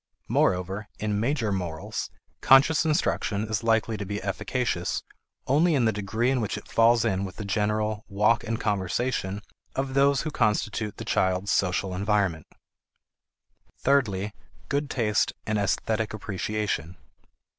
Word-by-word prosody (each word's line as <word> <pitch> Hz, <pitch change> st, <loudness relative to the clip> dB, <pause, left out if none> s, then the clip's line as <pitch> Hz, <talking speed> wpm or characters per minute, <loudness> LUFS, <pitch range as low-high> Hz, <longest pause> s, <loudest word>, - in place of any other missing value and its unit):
Moreover, 95 Hz, +3 st, +1 dB
in 105 Hz, -1 st, -1 dB
major 120 Hz, -2 st, 0 dB
morals, 85 Hz, -5 st, -3 dB, 0.3 s
conscious 140 Hz, +5 st, +6 dB
instruction 110 Hz, -8 st, 0 dB
is 110 Hz, -2 st, -1 dB
likely 115 Hz, -1 st, +1 dB
to 100 Hz, -, -4 dB
be 100 Hz, +1 st, -4 dB
efficacious 100 Hz, -2 st, -2 dB, 0.4 s
only 155 Hz, +5 st, +3 dB
in 125 Hz, -4 st, +2 dB
the 110 Hz, -, +4 dB
degree 110 Hz, +4 st, 0 dB
in 130 Hz, -2 st, +1 dB
which 105 Hz, -, -2 dB
it -, -, -10 dB
falls 115 Hz, 0 st, +4 dB
in 95 Hz, -3 st, 0 dB
with 95 Hz, -2 st, -6 dB
the 105 Hz, -, -6 dB
general 105 Hz, +1 st, 0 dB
"walk 105 Hz, +3 st, +2 dB
and 115 Hz, 0 st, -2 dB
conversation" 100 Hz, 0 st, -1 dB, 0.3 s
of 135 Hz, 0 st, -2 dB
those 140 Hz, 0 st, +3 dB
who 155 Hz, -, -3 dB
constitute 105 Hz, -3 st, 0 dB
the -, -, -6 dB
child's 95 Hz, +1 st, +1 dB
social 95 Hz, 0 st, +1 dB
environment. 95 Hz, -4 st, 0 dB, 1.3 s
Thirdly, 105 Hz, -8 st, +1 dB, 0.4 s
good 140 Hz, 0 st, 0 dB
taste 105 Hz, -4 st, +1 dB
and 110 Hz, -1 st, 0 dB
esthetic 110 Hz, +2 st, 0 dB
appreciation. 100 Hz, -4 st, -3 dB
105 Hz, 135 wpm, -26 LUFS, 100-120 Hz, 1.3 s, conscious